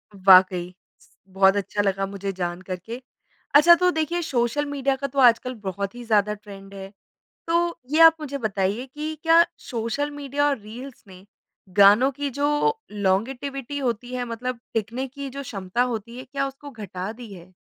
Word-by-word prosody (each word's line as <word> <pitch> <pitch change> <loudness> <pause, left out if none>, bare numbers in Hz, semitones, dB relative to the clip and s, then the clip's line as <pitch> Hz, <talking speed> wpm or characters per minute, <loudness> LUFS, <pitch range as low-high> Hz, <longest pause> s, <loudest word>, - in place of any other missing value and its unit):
वाक़ई। 185 -2 +5 0.6
बहुत 195 0 +4
अच्छा 205 +1 -1
लगा 195 -1 0
मुझे 195 0 -5
जानकर 180 0 -4
के। 235 +3 -7 0.5
अच्छा, 335 +4 +8
तो 360 +1 +2
देखिए 320 +1 -1
सोशल 270 -1 0
मीडिया 275 -1 -1
का 275 +1 -4
तो 275 +1 -3
आजकल 250 0 +4
बहुत 200 +3 -4
ही 245 - -8
ज़्यादा 210 -2 +2
ट्रेंड 200 -2 -12
है, 195 0 -9 0.6
तो 340 +1 0
ये 310 +2 +2
आप 325 0 +8
मुझे 285 -2 -5
बताइए 210 +1 -1
कि 305 +1 -4
क्या 330 +1 +6 0.3
सोशल 240 +5 -2
मीडिया 290 0 -1
और 280 -2 0
रील्स 235 +5 -11
ने 185 0 -14 0.5
गानों 205 +7 +7
की 285 +1 -4
जो 295 - 0
लॉन्जेविटी 245 +8 -2
होती 245 -2 -3
है 250 -1 -2
मतलब 240 +1 -5 0.2
देखने 230 +5 -2
की 280 +2 -10
ये 275 - -5
जो 280 +2 -6
क्षमता 200 -2 -2
होती 235 -1 -4
है, 255 - -8
क्या 275 +1 -3
उसको 275 +1 -9
घटा 200 -5 -6
दी 230 -2 -11
है? 180 0 -14
245 Hz, 175 wpm, -24 LUFS, 200-280 Hz, 0.6 s, अच्छा